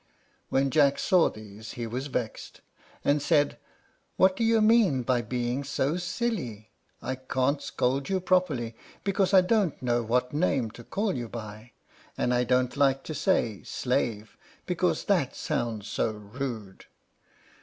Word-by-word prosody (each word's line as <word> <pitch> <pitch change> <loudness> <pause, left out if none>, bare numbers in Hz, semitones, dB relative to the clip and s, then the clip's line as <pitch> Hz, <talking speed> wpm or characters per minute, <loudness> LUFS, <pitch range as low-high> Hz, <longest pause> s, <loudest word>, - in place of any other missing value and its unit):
When 135 0 +2
Jack 140 -2 +4
saw 185 -4 +4
these 110 0 -10
he 120 - -4
was 125 +5 -4
vexed, 125 -5 -4 0.4
and 145 +1 +3
said, 145 -1 +2 0.6
"What 185 0 +5
do 230 - -1
you 225 0 +4
mean 215 - +4
by 125 0 +1
being 120 +3 -2
so 140 +2 0
silly? 175 - -3 0.3
I 130 - -2
can't 130 +2 -1
scold 135 +2 -1
you 190 -1 +1
properly, 175 -11 +1 0.3
because 195 -1 +1
I 190 -2 +7
don't 190 -3 +1
know 120 -1 +1
what 125 +3 0
name 140 -8 +1
to 120 +1 -12
call 200 - -1
you 120 -3 -4
by, 110 +1 -8 0.4
and 125 - +1
I 125 0 +2
don't 125 0 +1
like 135 -1 +2
to 155 - -5
say 130 - +1
'Slave,' 110 -4 -2 0.3
because - - 0
that - - +1
sounds 110 -4 -2
so - - 0
rude. 105 -1 -6
130 Hz, 150 wpm, -28 LUFS, 115-160 Hz, 0.6 s, I